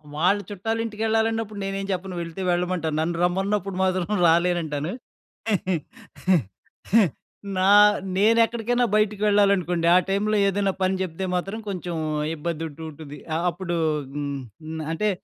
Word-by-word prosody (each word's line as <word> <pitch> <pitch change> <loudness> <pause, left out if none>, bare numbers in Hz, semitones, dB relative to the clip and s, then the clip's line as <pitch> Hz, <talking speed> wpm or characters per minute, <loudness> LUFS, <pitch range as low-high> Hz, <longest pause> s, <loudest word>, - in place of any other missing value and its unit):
వాళ్ళ 180 +6 +3
చుట్టాలింటికెళ్ళాలన్నప్పుడు 225 +1 -1
నేనేం 195 0 -3
చెప్పను, 185 0 -5
వెళ్తే 170 +2 -6
వెళ్ళమంటాను. 175 -3 -1
నన్ను 170 +1 -1
రమ్మన్నప్పుడు 195 +2 0
మాత్రం 185 -1 +1 0.2
రాలేనంటాను. 165 -2 +1 2.7
నా 190 +2 +4 0.5
నేనెక్కడికైనా 230 +3 +3
బయటికి 210 -1 +1
వెళ్ళాలనుకోండి, 195 -5 +3
ఆ - - +8
టైమ్‌లో 210 +2 +1
ఏదన్నా 195 0 +1
పని 185 +1 +2
చెప్తే 185 0 -3
మాత్రం 195 +5 -2
కొంచుం 180 -3 -4 0.4
ఇబ్బందుంటూ 160 -1 -5
ఉంటుంది. 150 -1 -10 0.2
ఆహ్, 170 +2 -1
అప్పుడూ 175 0 -3 0.4
హ్మ్, 145 -1 -3 0.3
హ్మ్, 160 0 -5
అంటే 210 +6 0
185 Hz, 110 wpm, -24 LUFS, 170-205 Hz, 2.7 s, ఆ